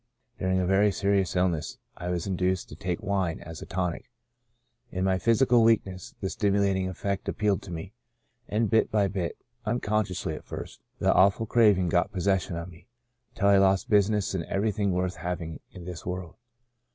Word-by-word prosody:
During 95 Hz, 0 st, +1 dB
a 90 Hz, -, +1 dB
very 100 Hz, +3 st, +4 dB
serious 100 Hz, -1 st, +1 dB
illness 90 Hz, -4 st, 0 dB, 0.2 s
I 90 Hz, -, -5 dB
was 90 Hz, -2 st, -1 dB
induced 95 Hz, -1 st, -1 dB
to -, -, -9 dB
take 90 Hz, +5 st, -3 dB
wine 95 Hz, -4 st, 0 dB
as 80 Hz, 0 st, -9 dB
a -, -, -8 dB
tonic. 90 Hz, -2 st, -3 dB, 0.8 s
In 95 Hz, -3 st, -3 dB
my 95 Hz, -1 st, +2 dB
physical 120 Hz, +4 st, +4 dB
weakness 100 Hz, -5 st, +1 dB
the -, -, -3 dB
stimu 100 Hz, 0 st, +1 dB
lating 95 Hz, -2 st, +1 dB
effect 100 Hz, +2 st, -3 dB
appealed 100 Hz, -1 st, +1 dB
to 95 Hz, -, -10 dB
me 85 Hz, +4 st, -6 dB, 0.5 s
and 110 Hz, +2 st, +1 dB
bit 110 Hz, +1 st, +3 dB
by 105 Hz, -2 st, +2 dB
bit 95 Hz, -3 st, -3 dB, 0.3 s
(unconsciously 105 Hz, -7 st, -1 dB
at -, -, -7 dB
first) -, -, -8 dB, 0.2 s
the -, -, +3 dB
awful 100 Hz, +4 st, +4 dB
craving 105 Hz, -5 st, +4 dB
got 90 Hz, +4 st, +2 dB
possession 95 Hz, -2 st, 0 dB
of 85 Hz, +1 st, -5 dB
me, 85 Hz, -, -17 dB, 0.5 s
until 100 Hz, -2 st, +3 dB
I 100 Hz, -, +6 dB
lost 95 Hz, +1 st, +2 dB
business 105 Hz, -1 st, +3 dB
and 90 Hz, -3 st, -1 dB
everything 100 Hz, 0 st, 0 dB
worth 90 Hz, 0 st, -1 dB
having 85 Hz, -2 st, -4 dB
in 90 Hz, -, -10 dB
this 90 Hz, -2 st, -7 dB
world. 90 Hz, -1 st, -5 dB
95 Hz, 175 wpm, -27 LUFS, 90-100 Hz, 0.8 s, I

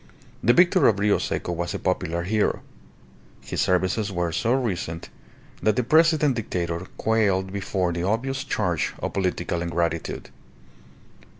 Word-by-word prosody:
The 120 Hz, -, +5 dB
victor 175 Hz, +3 st, +5 dB
of 105 Hz, -, +3 dB
Rio 105 Hz, +1 st, +2 dB
Seco -, -, -2 dB
was 85 Hz, 0 st, -3 dB
a -, -, -1 dB
popular 85 Hz, -2 st, -1 dB
hero. 105 Hz, +3 st, 0 dB, 0.8 s
His -, -, -3 dB
services 95 Hz, +3 st, +1 dB
were 90 Hz, -2 st, -1 dB
so 115 Hz, +8 st, 0 dB
recent 90 Hz, -10 st, -2 dB, 0.5 s
that 110 Hz, -, +2 dB
the 125 Hz, -, +1 dB
President 155 Hz, +1 st, +4 dB
Dictator 85 Hz, -4 st, -3 dB
quailed 100 Hz, -4 st, +1 dB
before 95 Hz, -3 st, -1 dB
the 85 Hz, -, -3 dB
obvious 130 Hz, +8 st, -1 dB
charge 90 Hz, -, -1 dB
of -, -, -4 dB
political 90 Hz, -2 st, -1 dB
ingratitude. 85 Hz, -1 st, -2 dB
95 Hz, 135 wpm, -24 LUFS, 85-115 Hz, 0.8 s, The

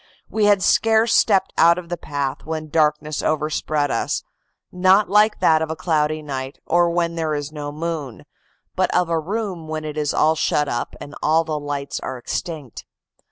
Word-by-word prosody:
We 215 Hz, -1 st, +2 dB
had 205 Hz, -2 st, +4 dB
scarce 225 Hz, +3 st, +3 dB
stepped 195 Hz, -3 st, +3 dB
out 170 Hz, +1 st, +6 dB
of 175 Hz, -2 st, -7 dB
the 175 Hz, -, -1 dB
path 145 Hz, -4 st, -4 dB
when 155 Hz, 0 st, -5 dB
darkness 150 Hz, -1 st, +1 dB
overspread 150 Hz, -1 st, 0 dB
us, 115 Hz, -, -1 dB, 0.5 s
not 185 Hz, +2 st, +3 dB
like 210 Hz, +1 st, +4 dB
that 160 Hz, -1 st, +4 dB
of 160 Hz, -, -2 dB
a 160 Hz, -, -3 dB
cloudy 155 Hz, -2 st, 0 dB
night, 135 Hz, -2 st, -5 dB
or 175 Hz, +1 st, +3 dB
when 170 Hz, 0 st, 0 dB
there 160 Hz, -2 st, -1 dB
is 145 Hz, 0 st, -4 dB
no 145 Hz, -1 st, -6 dB
moon, 155 Hz, -5 st, -5 dB, 0.5 s
but -, -, +1 dB
of 180 Hz, -1 st, +2 dB
a 165 Hz, -1 st, +1 dB
room 185 Hz, -1 st, -4 dB
when 155 Hz, 0 st, -4 dB
it 155 Hz, 0 st, -4 dB
is 150 Hz, -1 st, 0 dB
all 155 Hz, +1 st, +3 dB
shut 150 Hz, -2 st, 0 dB
up 120 Hz, -2 st, -3 dB
and 145 Hz, -, -9 dB
all 160 Hz, +2 st, +3 dB
the 155 Hz, -2 st, -3 dB
lights 145 Hz, -1 st, -4 dB
are 130 Hz, -, -5 dB
extinct. 145 Hz, +1 st, -5 dB
155 Hz, 185 wpm, -21 LUFS, 150-175 Hz, 0.5 s, out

